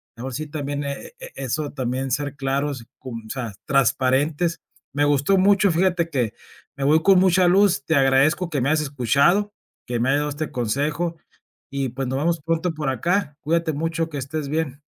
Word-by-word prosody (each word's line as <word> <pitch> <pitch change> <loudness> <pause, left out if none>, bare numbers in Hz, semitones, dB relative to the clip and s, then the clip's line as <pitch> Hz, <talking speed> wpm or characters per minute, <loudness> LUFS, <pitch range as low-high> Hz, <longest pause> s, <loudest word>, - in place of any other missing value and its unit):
luego 125 +3 -6
sí, 155 +5 -4
también 145 -1 -4
e 140 - -6 0.2
eso, 140 +3 -3
también 130 0 -2
ser 145 +2 -2
claros, 135 -2 -2
cum 115 -3 -7
o - - -14
sea, 125 -4 -4
transparentes. 135 +5 +1 0.3
Me 145 - +1
gustó 145 +5 +3
mucho, 200 +1 +4
fíjate 170 0 +1
que, 125 -8 -1 0.4
me 135 - -2
voy 155 +3 +4
con 195 0 +6
mucha 185 -1 +4
luz, 195 -6 +4
te 160 - +1
agradezco 140 +6 +3
que 145 -4 -1
me 135 - +1
hayas 155 +1 +3
escuchado, 145 - +2 0.3
que 120 -1 -2
me 120 - +1
hayas 140 +2 +3
dado 150 - -2
este 150 +1 -4
consejo 145 +8 -1 0.5
y 135 -1 -1
pues 130 +2 -4
nos 130 +1 -2
vamos 165 +4 0
pronto 165 +2 -1
por 150 -3 -4
acá, 155 - 0
cuídate 165 +1 0
mucho, 165 +2 -1
que 150 - -6
estés 140 +3 -4
bien. 150 -3 -2
145 Hz, 185 wpm, -23 LUFS, 135-165 Hz, 0.5 s, con